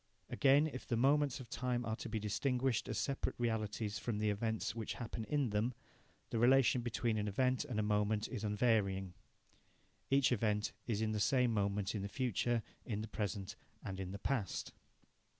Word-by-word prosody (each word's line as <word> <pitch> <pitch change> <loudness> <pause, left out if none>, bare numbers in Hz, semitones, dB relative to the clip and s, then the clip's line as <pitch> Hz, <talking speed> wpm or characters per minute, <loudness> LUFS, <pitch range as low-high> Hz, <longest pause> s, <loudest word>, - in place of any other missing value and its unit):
Again, 140 +2 +5
if 135 -5 -5
the 115 - 0
moments 140 +2 +3
of 130 - -9
time 120 +1 -1
are 110 - -1
to - - -6
be 110 - -1
distinguished 125 +3 0
as - - -2
separate 140 -1 -1
realities 110 -2 -1
from 115 -3 -2
the 105 0 +1
events 110 +2 -1
which 115 -2 -4
happen 115 -2 -5
in 145 -5 0
them, 110 +4 0 0.6
the 115 - 0
relation 130 +1 +5
between 115 -1 0
an 105 - -1
event 130 +6 +1
and 125 -7 -2
a - - +2
moment 105 0 +1
is 105 - -5
unvarying. 105 -4 +1 1.0
Each 135 -1 +4
event 105 -2 +1 0.2
is 110 -2 0
in 110 - 0
the 105 - -1
same 125 +2 +3
moment 100 -1 0
in 105 - -2
the 100 - -4
future, 120 -1 0 0.2
in 105 -3 -3
the 110 - -5
present, 100 -3 -3 0.3
and 95 0 -4
in 95 -1 -4
the 100 - -5
past. 105 -3 -2
110 Hz, 185 wpm, -36 LUFS, 105-125 Hz, 1.0 s, Again